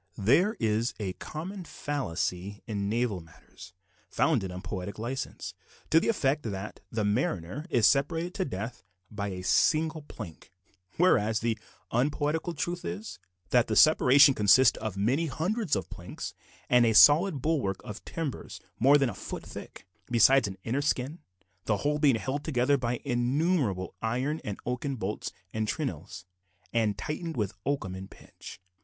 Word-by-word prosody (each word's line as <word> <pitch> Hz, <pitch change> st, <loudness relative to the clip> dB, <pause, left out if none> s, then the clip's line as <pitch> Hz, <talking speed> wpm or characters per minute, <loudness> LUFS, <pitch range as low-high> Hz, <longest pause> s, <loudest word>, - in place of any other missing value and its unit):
There 150 Hz, -, +3 dB
is 110 Hz, +2 st, 0 dB
a 95 Hz, -3 st, -3 dB
common 180 Hz, -, -7 dB
fallacy 100 Hz, -, -3 dB
in 100 Hz, -4 st, -2 dB
naval 110 Hz, -4 st, 0 dB
matters 80 Hz, +1 st, -15 dB, 0.4 s
founded 110 Hz, -, +1 dB
on 90 Hz, 0 st, -7 dB
poetical 100 Hz, +3 st, -5 dB
license, 130 Hz, +3 st, -4 dB, 0.4 s
to 160 Hz, -, +7 dB
the -, -, -2 dB
effect 150 Hz, -10 st, +1 dB
that 100 Hz, -3 st, -6 dB
the 110 Hz, -2 st, -1 dB
mariner 105 Hz, -, -1 dB
is 120 Hz, -8 st, +3 dB
separated 165 Hz, +6 st, +2 dB
from 190 Hz, -7 st, -2 dB
death 110 Hz, +1 st, -5 dB, 0.3 s
by 100 Hz, -1 st, -3 dB
a 90 Hz, -2 st, -5 dB
single 160 Hz, -, +2 dB
plank; 85 Hz, -, -10 dB, 0.5 s
whereas, 110 Hz, -, +3 dB
the 115 Hz, -1 st, 0 dB, 0.4 s
unpoetical 150 Hz, +6 st, 0 dB
truth 175 Hz, +4 st, -3 dB
is, 95 Hz, +6 st, -6 dB, 0.3 s
that 125 Hz, -2 st, +4 dB
the 110 Hz, -, -1 dB
separation 140 Hz, +1 st, +7 dB
consists 105 Hz, +4 st, +5 dB
of 105 Hz, -3 st, -4 dB
many 130 Hz, +11 st, +1 dB
hundreds 180 Hz, -, -1 dB
of 90 Hz, -, -3 dB
planks, -, -, -7 dB, 0.3 s
and 125 Hz, -1 st, +5 dB
a 115 Hz, -1 st, +3 dB
solid 150 Hz, -, +7 dB
bulwark 130 Hz, -, 0 dB
of 105 Hz, -, -8 dB
timbers 160 Hz, -5 st, -5 dB, 0.2 s
more 140 Hz, +5 st, +6 dB
than 140 Hz, -2 st, +2 dB
a -, -, -8 dB
foot -, -, -7 dB
thick, -, -, -10 dB, 0.2 s
besides 125 Hz, +1 st, +5 dB
an 95 Hz, -1 st, -7 dB
inner 130 Hz, +5 st, -1 dB
"skin," 145 Hz, +2 st, -1 dB, 0.5 s
the 105 Hz, -, +1 dB
whole 150 Hz, 0 st, +1 dB
being 145 Hz, -5 st, +4 dB
held 135 Hz, +5 st, -3 dB
together 140 Hz, -2 st, +2 dB
by 125 Hz, -2 st, -1 dB
innumerable 125 Hz, -, 0 dB
iron 130 Hz, +7 st, -1 dB
and 105 Hz, -2 st, -4 dB
oaken 125 Hz, +3 st, -2 dB
bolts 105 Hz, -3 st, -4 dB, 0.2 s
and 110 Hz, 0 st, -1 dB
trenails, 95 Hz, -, -4 dB, 0.5 s
and 110 Hz, -3 st, +1 dB
tightened 160 Hz, 0 st, -4 dB
with 105 Hz, -4 st, -1 dB
oakum 135 Hz, -10 st, -1 dB
and 95 Hz, +1 st, -8 dB
pitch. -, -, -13 dB
125 Hz, 155 wpm, -28 LUFS, 105-150 Hz, 0.5 s, to